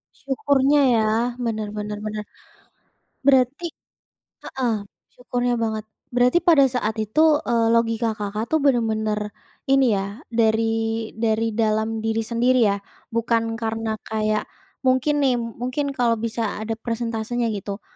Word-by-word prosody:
Syukurnya 280 0 +2 0.2
ya 220 - +3 0.4
bener 220 -2 -2
bener 210 0 -4
bener. 215 0 -4 1.0
Berarti 265 +3 +3 0.8
heeh, 250 -4 -1 0.4
syukurnya 245 0 -1
banget. 220 -1 -2 0.3
Berarti 245 +6 +4
pada 320 -5 +6
saat 225 -4 -1
itu, 215 +9 +1 0.3
eee, 230 -1 +3
logika 230 -1 +1
Kakak 210 +1 -3
tuh 315 - +2
bener-bener 220 -5 +1 0.5
ini 270 -1 +5
ya 200 +6 -5
dari 225 -1 +2 0.5
dari 225 0 +1
dalam 220 +1 +1
diri 225 0 +1
sendiri 240 +3 +2
ya. 200 - 0 0.3
Bukan 230 -1 0
karena 225 -1 -2
kayak 215 -1 0 0.4
mungkin 260 +3 +3
nih, 260 - +4
mungkin 245 +5 -3
kalau 240 -2 +3
bisa 230 +1 -3 0.2
ada 225 +1 -2
presentasenya 230 0 -2
gitu, 200 +1 -6
230 Hz, 125 wpm, -23 LUFS, 220-250 Hz, 1.0 s, pada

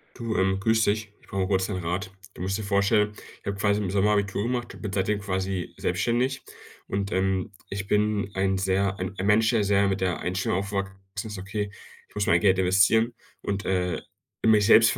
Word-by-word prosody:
Du, 115 -3 -3
ähm, 95 0 +2
grüß 110 +2 +3
dich. 105 0 0
Ich - - -23
brauche 95 -1 -1
kurz 95 0 +1
'nen 95 - -2
Rat. 90 +4 -2 0.2
Du - - -10
musst 95 +2 -1
dir 110 - -5
vorstellen, 100 +1 +2 0.3
ich - - -27
habe 100 -1 -2
quasi 100 +1 +2
im 95 - -2
Sommer 100 +1 +3
Abitur 100 -1 0
gemacht 120 0 -2
und - - -12
bin 105 - -4
seitdem 100 +2 +1
quasi 95 -2 -3
selbstständig. 125 +3 0 0.5
Und, 100 +1 -2
ähm, 95 0 0 0.2
ich 100 0 -4
bin 105 -1 +1
ein 95 0 +1
sehr 95 +1 +1
ein 95 +1 -3
ein 95 - -2
Mensch, 105 +2 +4
der 115 -3 +2
sehr 100 0 +3
mit 95 0 -1
der 90 -3 0
Einstellung 90 0 -1
aufgewachsen 100 -1 -3 0.3
ist: 105 -2 -6
„Okay, 100 +2 -3 0.4
ich - - -25
muss 105 -1 0
mein 85 - +5
Geld 95 -2 +4
investieren 100 +6 +4 0.3
und, 100 -1 -3
äh, 90 -2 0 0.4
mich 110 -2 +5
selbst 115 +1 +6
100 Hz, 205 wpm, -26 LUFS, 95-105 Hz, 0.5 s, selbst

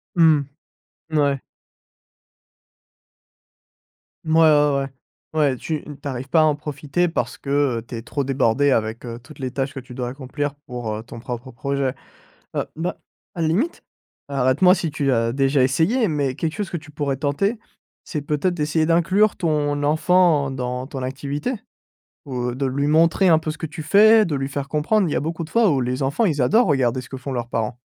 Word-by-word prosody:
Mmh, 160 -4 +5 0.7
n 155 - -1
ouais. 140 -2 +1 2.8
Mouais, 160 +1 +3
ouais 150 -2 +5
ouais. 135 - -3 0.5
Ouais, 145 -4 +2
tu 155 +3 -4
n 145 -2 -9
tu 145 - -13
arrives 130 0 -5
pas 160 - +4
à - - +5
en 155 -1 +3
profiter 150 +4 -2
parce 165 - -3
que, 140 -3 0
heu, - - -6
tu 120 - -6
es 115 - -6
trop 140 +3 -3
débordé 135 +1 +2
avec, 110 -1 0
heu, 115 0 -6
toutes 130 +5 -15
les 130 -2 -3
tâches 135 +2 -2
que 135 - -5
tu 125 0 -12
dois 125 -1 -3
accomplir 140 +2 -4
pour, 120 -3 -4
heu, 110 - -5
ton 115 0 -10
propre 120 +2 -6
projet. 135 +1 -2 0.6
Heu, - - +1
bah, 165 +3 -3 0.4
à 170 - -3
la 160 - +2
limite 235 - 0 0.5
arrête 130 +2 +1
moi 180 +1 +8
si 170 -3 -2
tu 140 -3 0
as 115 -1 +1
déjà 135 +1 +2
essayé, 170 - +2
mais 145 -4 -1
quelque 155 +3 -2
chose 205 -2 -4
que 170 - -3
tu 150 - -14
pourrais 145 -2 -2
tenter, 175 - 0 0.5
c'est 150 -4 -4
peut-être 150 +5 0
d'essayer 155 0 0
d'inclure 185 +5 +3
ton 145 -3 0
enfant, 160 -1 +3
dans 125 -1 -3
ton 135 -2 -6
activité, 140 - -3 0.7
ou, 125 -3 -3
heu, 120 - -5
de 140 - -2
lui 140 +2 -1
montrer 165 +5 +4
un 160 - +6
peu 155 - -4
ce 155 - -7
que 160 - -3
tu 155 +1 -7
fais, 215 +7 +6
de 160 - -2
lui 135 -1 -2
faire 140 0 -4
comprendre, 180 +8 +1
il - - -3
y - - 0
a - - +1
beaucoup 165 +3 -3
de 155 - -12
fois 230 -4 +4
où 135 -4 +1
les 125 +3 -2
enfants 140 +12 +1
ils 155 -7 +1
adorent 220 - +4
regarder 130 -3 +1
ce 125 - -13
que 130 - -6
font 135 +1 -5
leurs 120 -2 -3
parents. 115 +1 -2
145 Hz, 205 wpm, -22 LUFS, 130-160 Hz, 2.8 s, moi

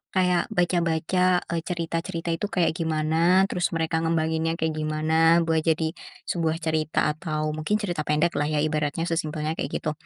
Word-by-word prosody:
kayak 180 -2 +2
baca-baca, 175 +1 +1
eee, 170 - 0
cerita-cerita 165 -1 -3
itu 165 +5 -2
kayak 180 -4 +1
gimana, 165 +3 +2
terus 180 - +1
mereka 160 0 0
ngembanginnya 165 0 0
kayak 160 -1 -1
gimana 160 +2 +3
buat 165 -1 +1
jadi 160 0 0 0.3
sebuah 165 -2 -1
cerita, 155 -1 +1
atau 155 -1 -3
mungkin 155 +7 -1
cerita 175 -7 -2
pendek 150 +3 +2
lah 145 - +1
ya 150 -1 0
ibaratnya, 155 +1 -1
sesimpelnya 155 -2 -2
kayak - - -1
gitu. 155 - -1
160 Hz, 155 wpm, -25 LUFS, 155-170 Hz, 0.3 s, gimana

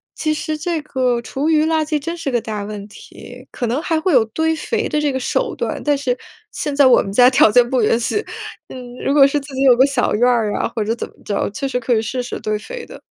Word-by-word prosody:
其 310 -1 -1
实 310 0 -3
这 325 +1 -2
个 255 -5 -1
厨 270 +5 -3
余 310 -1 +3
垃 320 -1 +1
圾 305 0 -1
真 335 +4 -4
是 310 -5 -3
个 240 -2 0
大 210 -2 -5
问 205 0 -7
题， 245 +4 -13
可 245 - -3
能 240 +5 0
还 325 -1 0
会 340 +2 0
有 245 -4 +5
堆 320 +8 -1
肥 315 - -2
的 300 - 0
这 295 -1 +1
个 260 - -2
手 250 - -1
段， - - -3
但 295 -1 +2
是 255 -3 -1 0.3
现 295 -2 -4
在 280 -2 +6
我 250 - +6
们 195 - -6
家 245 +3 +7
条 245 -4 +5
件 245 +1 +5
不 255 -3 +1
允 225 +2 +2
许， 420 - -1 0.4
嗯， 250 -1 -9
如 275 - +2
果 280 -2 +7
是 290 +1 0
自 280 0 -12
己 265 - -2
有 260 -3 +7
个 260 - +6
小 275 -3 0
院 240 +4 +3
儿 225 -4 +1
啊 - - 0
或 220 - 0
者 225 +2 -1
怎 - - -5
么 - - -22
着， 200 - -1
确 250 +7 -3
实 255 -2 -1
可 245 0 0
以 220 - +1
试 250 +3 -3
试 - - -6
堆 215 0 -2
肥 475 - -8
的。 - - -12
260 Hz, 290 characters per minute, -19 LUFS, 235-300 Hz, 0.4 s, 家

